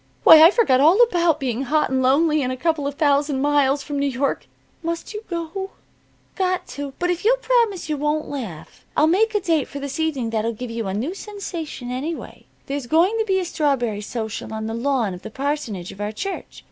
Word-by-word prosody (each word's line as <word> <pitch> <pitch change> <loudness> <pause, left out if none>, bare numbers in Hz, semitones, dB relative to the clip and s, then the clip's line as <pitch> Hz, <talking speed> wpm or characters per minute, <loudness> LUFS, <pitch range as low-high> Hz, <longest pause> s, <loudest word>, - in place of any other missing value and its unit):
Why, 315 - +10
I 325 - +10
forgot 390 - +3
all 325 - +5
about 345 -8 +2
being 260 0 -2
hot 305 +2 +1
and 260 0 +1
lonely 300 +4 +3
and 255 -1 -1
a 255 - -4
couple 310 0 0
of 285 - -4
thousand 285 -1 +2
miles 285 -1 +2
from 285 +1 -4
New 280 - +1
York. 270 +1 -2 0.3
Must 335 +5 -4
you 425 +1 -6
go?" 345 +3 -4 0.6
"Got 370 -1 0
to. 285 -1 -6
But 355 0 0
if 355 - -3
you'll - - +4
promise 470 -8 +1
you 305 -1 -1
won't 300 +2 -1
laugh, 220 - -7
I'll 305 - +5
make 425 +7 +2
a - - +4
date 330 -7 0
for 285 - -7
this 280 +1 -5
evening 280 -8 -1
that'll 225 +1 -1
give 240 +2 -7
you 230 -2 -3
a 190 - -2
new 260 - -2
sensation 350 - -6
anyway. 295 +6 -5 0.2
There's 275 -2 -4
going 340 - +3
to 445 - +1
be 380 -2 +1
a 370 - -2
strawberry 270 -11 0
social 220 0 -5
on 220 0 -4
the 225 - -3
lawn 235 -4 0
of 180 - -9
the 220 - -8
parsonage 265 - -3
of 195 - -10
our 205 +1 -2
church. 390 - -6
290 Hz, 215 wpm, -22 LUFS, 255-340 Hz, 0.6 s, Why